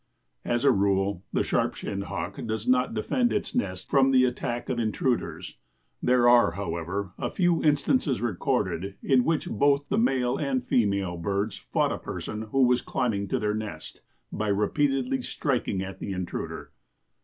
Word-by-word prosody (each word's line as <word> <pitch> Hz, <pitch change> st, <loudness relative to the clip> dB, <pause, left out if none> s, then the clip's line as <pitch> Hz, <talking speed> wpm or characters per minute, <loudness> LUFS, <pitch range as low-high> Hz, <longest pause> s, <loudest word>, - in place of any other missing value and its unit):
As 120 Hz, +2 st, 0 dB
a 140 Hz, -, +7 dB
rule 100 Hz, -3 st, +1 dB
the -, -, +1 dB
Sharp -, -, 0 dB
shinned 100 Hz, 0 st, -4 dB
Hawk 95 Hz, -5 st, -5 dB
does 110 Hz, 0 st, -3 dB
not 125 Hz, -2 st, +2 dB
defend 240 Hz, -, +1 dB
its -, -, -2 dB
nest 90 Hz, -1 st, -2 dB
from 135 Hz, -1 st, +5 dB
the 130 Hz, -1 st, +5 dB
attack 120 Hz, -1 st, -3 dB
of 120 Hz, -, -1 dB
intruders. 120 Hz, +2 st, -2 dB, 0.4 s
There 125 Hz, -1 st, +4 dB
are, 120 Hz, -8 st, +6 dB
however, 90 Hz, +1 st, -3 dB
a -, -, -1 dB
few 175 Hz, -3 st, +1 dB
instances 145 Hz, -, +2 dB
recorded 100 Hz, -4 st, -1 dB
in 130 Hz, -2 st, +4 dB
which 160 Hz, +1 st, 0 dB
both 140 Hz, 0 st, +2 dB
the 205 Hz, -, +2 dB
male 130 Hz, -, +1 dB
and 135 Hz, -4 st, -1 dB
female 100 Hz, -7 st, +1 dB
birds 100 Hz, +4 st, -1 dB
fought -, -, 0 dB
a -, -, -3 dB
person 110 Hz, +1 st, -5 dB
who 135 Hz, +3 st, +3 dB
was 125 Hz, 0 st, +3 dB
climbing 105 Hz, -7 st, -1 dB
to -, -, 0 dB
their 105 Hz, 0 st, 0 dB
nest, 105 Hz, -8 st, -6 dB, 0.3 s
by 110 Hz, 0 st, -2 dB
repeatedly 130 Hz, +6 st, +1 dB
striking 125 Hz, -7 st, -1 dB
at 95 Hz, 0 st, -8 dB
the 100 Hz, -, -4 dB
intruder. 90 Hz, -1 st, -5 dB
115 Hz, 165 wpm, -27 LUFS, 100-130 Hz, 0.4 s, a